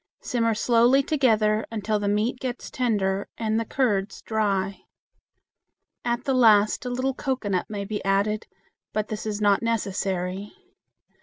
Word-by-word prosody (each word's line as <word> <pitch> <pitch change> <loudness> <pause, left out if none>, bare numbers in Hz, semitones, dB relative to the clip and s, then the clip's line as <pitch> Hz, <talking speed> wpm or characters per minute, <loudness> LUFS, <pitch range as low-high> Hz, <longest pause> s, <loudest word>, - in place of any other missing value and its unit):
Simmer 230 -4 0
slowly 240 +4 +4
together 220 -7 +2
until 215 -1 -1
the 205 - -2
meat 215 +5 0
gets 250 -1 -5
tender 200 -6 0
and 220 -1 0
the 230 - -2
curds 210 -6 -1
dry. 200 -3 -1 1.2
At 240 0 -1
the 275 - 0
last 215 -3 +4
a - - -2
little 255 +2 -1
cocoanut 230 -10 -2
may 200 -2 -4
be 210 +1 -4
added, 200 +2 0 0.5
but 215 0 -1
this 215 0 -4
is 210 -1 -2
not 205 -2 +3
necessary. 195 -3 -2
215 Hz, 140 wpm, -25 LUFS, 205-240 Hz, 1.2 s, slowly